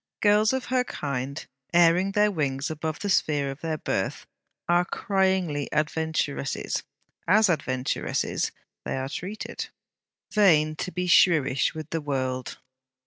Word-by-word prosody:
Girls 210 +1 +4
of 265 -1 -2
her 255 -1 +3
kind, 140 - -4 0.3
airing 175 +3 +4
their 210 0 +3
wings 140 -4 -1
above 155 0 -3
the 205 - -4
sphere 145 -7 +1
of 135 - -10
their 160 -1 -2
birth, - - -2 0.4
are 175 +1 +4
cryingly 190 -7 0
adventuresses. 150 -2 -1 0.5
As 205 +2 +5
adventuresses 130 -5 -1 0.3
they - - -3
are 130 0 -3
treated. 190 +8 -5 0.7
Vain 155 -7 +4
to 185 - -4
be 180 0 -2
shrewish 155 -7 +4
with 155 -1 -7
the 165 - -1
world! 130 -3 -3
160 Hz, 130 wpm, -26 LUFS, 140-190 Hz, 0.7 s, As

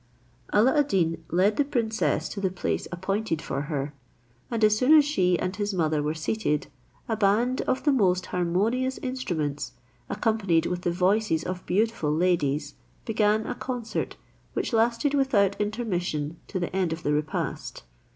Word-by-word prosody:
Alla 250 +8 +4
ad 290 - +3
Deen 165 - 0
led 190 +5 +2
the 290 - +4
princess 235 -6 0
to 200 - -5
the 190 - +1
place 180 -1 -2
appointed 190 0 -1
for 140 - -3
her, 145 -1 -2 0.6
and 230 -2 -1
as 215 0 +6
soon 265 +8 +6
as 295 - +6
she 180 - +2
and 185 +1 -2
his 205 0 -2
mother 155 -3 +1
were 150 +2 -1
seated, 155 -2 -1 0.4
a 225 - 0
band 220 +5 +2
of 255 - 0
the 295 - +4
most 185 -8 +2
harmonious 210 +9 0
instruments, 155 - -3 0.4
accompanied 200 -6 +1
with 180 0 -2
the 175 - 0
voices 185 -1 +2
of 180 0 -4
beautiful 210 -6 +1
ladies, 150 -4 +1 0.3
began 215 -1 +2
a - - -2
concert, 245 -3 -4 0.4
which - - -2
lasted 230 +5 +2
without 225 -9 +3
intermission 180 -8 -2
to 190 - -3
the 175 +1 -3
end 185 -3 +1
of 160 0 -4
the 145 - +1
repast. 150 +1 -3
195 Hz, 160 wpm, -26 LUFS, 170-225 Hz, 0.6 s, as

